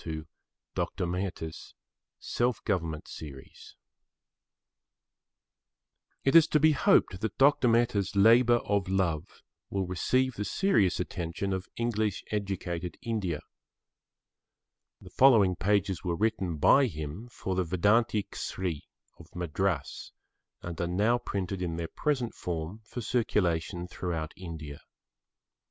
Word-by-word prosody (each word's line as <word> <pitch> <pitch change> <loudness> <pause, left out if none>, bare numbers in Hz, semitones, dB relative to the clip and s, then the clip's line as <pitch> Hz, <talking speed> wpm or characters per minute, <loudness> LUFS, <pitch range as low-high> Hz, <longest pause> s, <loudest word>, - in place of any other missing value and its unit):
[Pg 80 -1 -5 0.5
8] - - +1 0.2
VERNACULARS 90 -4 -5 0.4
AS - - -8
MEDIA 120 -4 +2
OF 90 - -3
INSTRUCTION 75 -2 -10 2.7
It 135 - +2
is 165 -1 +8
to 155 - +2
be 155 +1 +5
hoped 95 -9 +3
that 110 -2 -3
Dr. 135 -2 +5
Mehta's 115 -4 +2
labour 115 +4 +6
of 100 -2 0
love 90 -3 -1 0.3
will 95 -1 -1
receive 130 +9 +1
the 105 - -4
serious 105 - +2
attention 90 +2 -3
of 95 0 -4
English 110 -4 -1
educated 90 -4 -3
India. 100 -9 -2 1.6
The - - -14
following 110 -9 +5
pages 100 -1 0
were 85 -2 -1
written 95 -5 0
by 135 - +5
him 80 +4 -6
for 95 -5 -4
the 95 0 +1
Vedanta 105 +5 +2
Kesari 90 -7 -4 0.3
of - - -13
Madras 90 +2 -2 0.5
and 85 -1 -5
are 85 - 0
now 105 +7 +2
printed 95 -4 -3
in 85 -2 -2
their 85 0 -3
present 130 - -1
form 85 +4 -4
for 120 - -6
circulation 90 -6 0
throughout 85 -4 -4
India. 80 -5 -8
95 Hz, 120 wpm, -29 LUFS, 85-115 Hz, 2.7 s, is